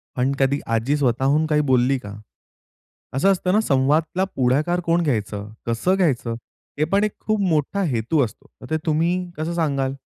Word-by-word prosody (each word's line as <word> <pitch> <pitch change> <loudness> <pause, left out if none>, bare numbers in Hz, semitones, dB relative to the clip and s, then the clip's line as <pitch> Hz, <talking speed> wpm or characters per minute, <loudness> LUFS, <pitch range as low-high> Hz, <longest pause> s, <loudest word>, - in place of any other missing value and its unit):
पण 130 +2 +1
कधी 140 +1 +2 0.2
आजी 125 +7 +1
स्वतःहून 135 +3 +2
काही 150 -1 +2
बोलली 130 +2 +3
का? 100 -3 -9 1.0
असं 150 +10 +3
असतं 185 0 0
ना 215 - +4
संवादाला 155 +3 +1
पुढाकार 140 +7 +1
कोण 170 +1 +2
घ्यायचं? 105 -6 -2 0.2
कसं 115 +11 +1
घ्यायचं? 135 -11 0 0.4
हे - - +3
पण 200 +6 +1
एक 210 - 0
खूप 215 -1 +1
मोठा 175 +1 0
हेतू 120 +6 +1
असतो. 110 - -12
तर 125 - -11
ते 160 - +1
तुम्ही 165 +3 +1 0.2
कसं 160 +2 -2
सांगाल? 140 -5 0
145 Hz, 165 wpm, -22 LUFS, 130-170 Hz, 1.0 s, ना